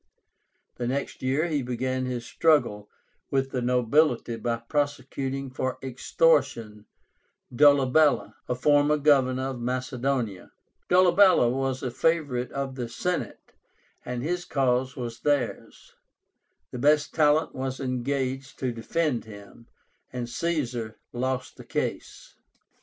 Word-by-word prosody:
The 120 - -2
next 135 +2 -3
year 135 +5 +1
he 155 -4 -1
began 130 +1 -2
his 120 -2 -4
struggle 130 -12 +1 0.4
with 135 -1 0
the 125 - -2
nobility 125 0 +2
by 115 +1 -2
prosecuting 135 +1 -3
for 130 0 -3
extortion 125 -5 +1 0.7
Dolabella, 145 +1 +4 0.2
a 125 - +1
former 145 +3 +3
Governor 135 -3 +2
of 125 - -7
Macedonia. 125 -3 -2 0.4
Dolabella 180 -7 +5
was 135 0 -2
a 125 - -2
favorite 140 -4 0
of 140 -1 -3
the 125 -3 -5
Senate, 180 +10 -4 0.5
and 125 0 -4
his 175 +3 -2
cause 130 -4 0
was 120 -2 -6
theirs. 145 -5 -2 0.8
The 125 - -6
best 150 +2 +3
talent 155 0 +3
was 130 0 -4
engaged 130 +1 -3
to 130 -2 -2
defend 125 +2 -1
him, 105 +2 -13 0.4
and 125 -1 -4
Caesar 120 -6 -3 0.2
lost 130 +1 -3
the - - -10
case. - - -4
130 Hz, 120 wpm, -26 LUFS, 125-145 Hz, 0.8 s, Dolabella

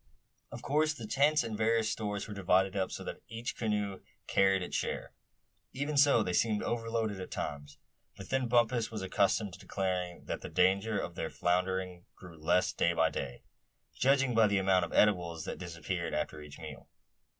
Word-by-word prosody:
Of - - -8
course 155 +2 +2
the 120 -7 -8
tents 145 +5 +3
and 115 -2 -4
various 110 0 +2
stores 105 -2 -3
were 105 - -6
divided 95 -1 +2
up 95 -1 -1
so - - -5
that - - -7
each 115 +2 -5
canoe 105 -3 -1 0.3
carried 95 -1 +3
its - - -5
share. - - -3 0.6
Even 145 +3 -2
so 140 -5 +5
they 90 - -2
seemed 105 +2 +2
overloaded 115 -3 -2
at 95 - -7
times; 70 0 -5 0.4
but 95 - -10
then 130 -2 +1
Bumpus 120 -1 +2
was 110 -3 -5
accustomed 100 +1 +1
to 95 - -11
declaring 90 -3 -3
that - - -4
the - - -7
danger 100 +4 +2
of 85 - -3
their 80 -2 -3
foundering 90 0 -1
grew 90 -3 -12
less 80 +4 +1
day 85 - +2
by 80 -1 +2
day, - - -5 0.5
judging 135 -1 +3
by 110 -1 +5
the 100 -1 +1
amount 95 -1 +3
of - - -10
eatables 85 -6 +2
that - - -5
disappeared 85 0 -4
after 75 0 -3
each 75 -1 -11
meal. 80 -3 -10
100 Hz, 185 wpm, -32 LUFS, 90-115 Hz, 0.6 s, so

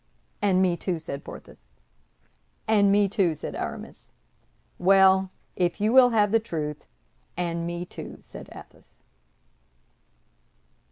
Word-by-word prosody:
"And 190 -2 +3
me, 180 -2 +2
too!" 180 -1 -2
said 150 -3 -7
Porthos. - - -12 1.0
"And 205 -2 +4
me, 205 0 +4
too!" 190 -5 +1
said 150 - -7
Aramis. - - -7 0.7
"Well, 190 0 +5 0.3
if 175 +2 0
you 215 +3 +1
will 255 -1 +7
have 210 -3 +2
the 225 - +4
truth, 155 -8 -5 0.5
and 170 -1 -2
me, 175 +1 -4
too!" - - -9
said - - -12
Athos. - - -16
190 Hz, 120 wpm, -25 LUFS, 170-205 Hz, 1.0 s, will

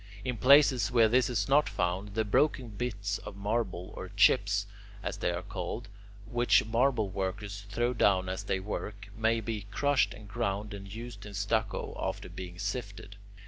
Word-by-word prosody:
In 125 -1 -1
places 130 -2 +6
where 120 -3 +5
this 125 +3 +3
is 105 -5 0
not 145 +2 +4
found, 95 +3 -2
the 110 0 +1
broken 130 +2 +2
bits 100 -3 -3
of 105 -1 -9
marble 100 -3 -2
or - - -6
"chips," - - +3 0.4
as - - -3
they - - 0
are - - -2
called, 115 -2 -5 0.4
which 120 0 +3
marble 115 -1 +2
workers 100 +1 -4
throw 120 +4 0
down 95 -5 +3
as 95 0 -4
they 95 - 0
work, 100 0 -5
may 115 +1 +2
be 105 -2 -4
crushed 140 +6 +2
and 105 0 -12
ground 100 +1 -2
and 100 -1 -8
used 115 +2 -8
in 100 - -9
stucco 100 +1 -1
after - - -3
being 90 -1 -8
sifted. 100 -1 -5
105 Hz, 170 wpm, -30 LUFS, 100-120 Hz, 0.4 s, places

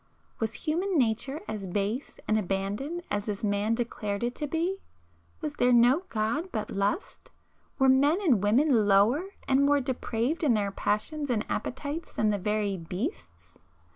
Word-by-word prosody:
Was 220 -1 -2
human 350 - -1
nature 255 +4 0
as 200 -3 -4
base 205 +8 -2
and 215 - +2
abandoned 210 - -2
as 205 0 -1
this 205 0 -3
man 205 +2 +1
declared 215 -3 -3
it 240 +1 0
to 295 - -2
be? 335 +6 -1 0.6
Was 150 - -3
there 250 - +2
no 245 +9 +5
God 235 +12 -1
but 215 -2 -3
Lust? 200 - -2 0.5
Were 265 - +4
men 280 +6 +4
and 280 - +3
women 225 +1 +3
lower 210 - +4 0.2
and 270 +1 +4
more 285 0 +4
depraved 255 +3 -2
in 265 -7 +4
their 200 -2 0
passions 280 +10 -1
and 225 -4 0
appetites 290 +5 -4
than 215 -1 +1
the 205 - -1
very 210 0 0
beasts? 185 - -6
235 Hz, 160 wpm, -28 LUFS, 205-290 Hz, 0.6 s, no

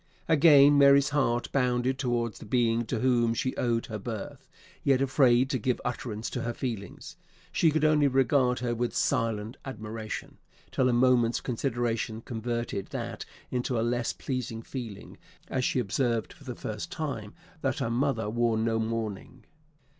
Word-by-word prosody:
Again 145 -3 +7
Mary's 140 0 +6
heart 130 -5 0
bounded 125 0 +1
towards 120 -4 -1
the - - -10
being 115 0 +1
to 115 -4 -2
whom 120 -3 +2
she 130 +3 -1
owed 115 -2 0
her 110 -1 -6
birth; 110 -1 -7 0.3
yet 135 -2 +3
afraid 130 -2 +4
to 130 - 0
give 125 +3 0
utterance 120 -2 -3
to 125 - -3
her 120 0 -3
feelings, 110 -7 -6 0.3
she 165 - +3
could 155 0 +1
only 150 -2 +4
regard 130 -1 +3
her 120 -1 0
with 120 +1 -2
silent 115 +1 0
admiration, 110 -3 -6 0.3
till 130 -1 +2
a - - +3
moment's 120 -1 +3
consideration 115 -3 -2
converted 115 -3 -3
that - - -5 0.3
into 125 -1 -1
a - - +1
less 120 0 0
pleasing 120 -4 -4
feeling, 115 -7 -8 0.3
as 130 - -1
she - - 0
observed 120 0 0
for 145 -6 -18
the 125 -2 -5
first 105 -1 -6
time 130 -10 -4 0.3
that 135 -2 0
her 115 - -1
mother 120 -3 0
wore 115 +1 +1
no 115 0 +1
mourning. 110 +1 -4
120 Hz, 160 wpm, -28 LUFS, 115-130 Hz, 0.3 s, Again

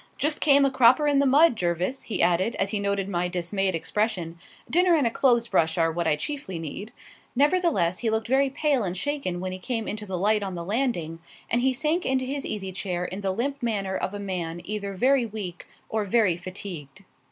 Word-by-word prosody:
Just 300 +1 0
came 280 -2 +5
a 275 - +2
cropper 260 +3 +5
in 285 -1 +3
the 280 - +3
mud, 295 +2 +5
Jervis," 180 +6 -1
he 220 - -1
added, 180 +6 +2
as 195 0 -1
he 210 - -1
noted 200 -1 -1
my 180 -2 -1
dismayed 185 +1 -1
expression. 170 -2 -2 0.3
"Dinner 355 0 +4
and 295 -5 +2
a 230 - +2
clothes 235 -2 +2
brush 165 -3 +1
are 165 -1 +2
what 170 0 -2
I 155 - +3
chiefly 190 - -5
need." 165 +7 -6 0.4
Nevertheless, 285 - +2
he 230 - 0
looked 220 0 -1
very 270 +2 +3
pale 285 -1 +1
and 185 -1 -3
shaken 275 -7 -2
when 185 +1 -3
he 185 - -6
came 225 +2 -3
into 210 0 -5
the 190 -1 -3
light 210 +3 +2
on 190 -2 -4
the 170 -1 -5
landing, 195 -7 -1 0.3
and 240 - +2
he 265 +1 +3
sank 310 +7 0
into 260 0 0
his 275 +2 -3
easy 195 -3 -4
chair 180 -2 -3
in 190 +3 -5
the 195 - -1
limp 270 +8 -2
manner 200 -5 -1
of 195 - -3
a - - -5
man 175 -4 -4
either 200 -1 -4
very 255 +3 +3
weak 200 -5 -7 0.2
or 220 -1 -1
very 205 -3 +2
fatigued. 180 -2 -8
205 Hz, 215 wpm, -26 LUFS, 180-260 Hz, 0.4 s, came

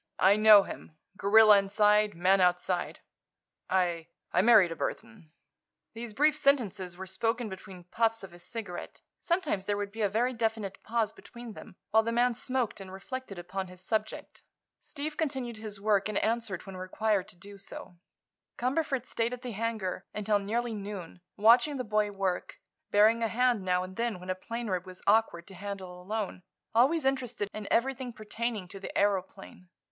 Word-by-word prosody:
I 195 +2 +5
know 215 -1 +8
him. 155 - -10 0.2
Gorilla 210 +1 +7
inside, 210 +1 +3
man 185 +3 +3
outside. 180 0 0 0.7
I—I 170 -3 0
married 210 -5 +6
a - - -3
Burthon." 220 -6 -5 0.6
These 225 -1 -7
brief 300 +3 +4
sentences 220 - +1
were 190 - -6
spoken 225 +4 -1
between 190 -1 -10
puffs 225 +4 0
of 190 - -9
his 175 0 -12
cigarette. 215 -4 -7 0.2
Sometimes 315 - -1
there 205 0 0
would 205 -1 -3
be 220 +2 -6
a 205 - +2
very 240 +5 +1
definite 220 -4 -2
pause 225 -2 0
between 235 -2 -11
them, 205 -2 -12 0.2
while 220 +1 +6
the 230 +1 -2
man 240 +1 +3
smoked 250 -3 -1
and 190 -1 -9
reflected 200 +2 -7
upon 185 +2 -5
his 180 0 -12
subject. 220 0 -3 0.4
Steve 300 +1 -6
continued 265 -7 -2
his 215 -2 -8
work 205 0 +2
and 210 - -1
answered 225 -5 -1
when 195 -1 -8
required 195 +1 0
to 205 - -12
do 200 +3 -12
so. 180 -2 -10 0.6
Cumberford 265 0 -1
stayed 230 0 -1
at 250 +1 -7
the 250 - -4
hangar 215 -4 -3
until 210 0 +1
nearly 230 +4 -2
noon, 200 -4 -7 0.2
watching 240 +7 +5
the 255 - -2
boy 210 -2 +1
work, 195 -3 -3 0.3
bearing 215 +3 +5
a 225 - +2
hand 245 -1 +2
now 180 -1 +1
and 185 0 -9
then 230 -5 -1
when 180 +1 -4
a - - +2
plane 230 +6 -6
rib 185 -2 -2
was 185 0 -11
awkward 205 -5 +2
to 195 - -12
handle 185 -2 -7
alone, 205 0 -4 0.3
always 265 +7 +3
interested 250 -6 -1
in 215 -1 -6
everything 260 +1 0
pertaining 215 -2 -4
to 195 +2 -9
the 195 - -6
aëroplane. 195 -2 -1
210 Hz, 170 wpm, -29 LUFS, 190-235 Hz, 0.7 s, know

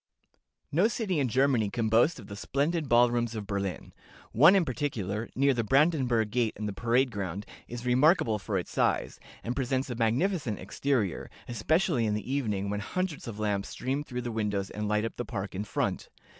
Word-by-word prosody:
"No 175 +9 +4
city 210 -7 -1
in 135 - +2
Germany 125 -3 +2
can 115 +1 -1
boast 120 +8 +3
of 110 - -10
the 100 - -8
splendid 145 +7 -1
ball 120 0 +5
rooms 120 -1 -1
of 105 -2 -4
Berlin. 100 -4 -4 0.4
One 155 - +7
in 190 -3 +3
particular, 110 - -3
near 140 +1 +3
the 120 -2 0
Brandenburg 130 -4 +2
gate 120 -2 +1
and 105 0 -3
the 105 - -3
Parade 120 +5 +1
ground, 100 -1 -4 0.2
is 120 +1 -7
remarkable 125 - +3
for 100 0 -2
its 90 - -4
size, - - 0 0.2
and 120 +2 -3
presents 130 0 -1
a - - -3
magnificent 120 - 0
exterior, 105 - -1 0.2
especially 155 - +1
in 105 - 0
the 105 +4 -4
evening, 105 -8 -1
when 105 - -2
hundreds 175 - -3
of 110 -3 -6
lamps 105 -2 -1
stream 135 +3 -2
through 125 -4 -5
the 120 - -3
windows 105 -3 -2
and 105 0 -3
light 105 +1 +1
up 115 - -5
the 120 - -2
park 100 -3 -5
in 100 +3 -3
front. - - -2
120 Hz, 195 wpm, -29 LUFS, 105-140 Hz, 0.4 s, One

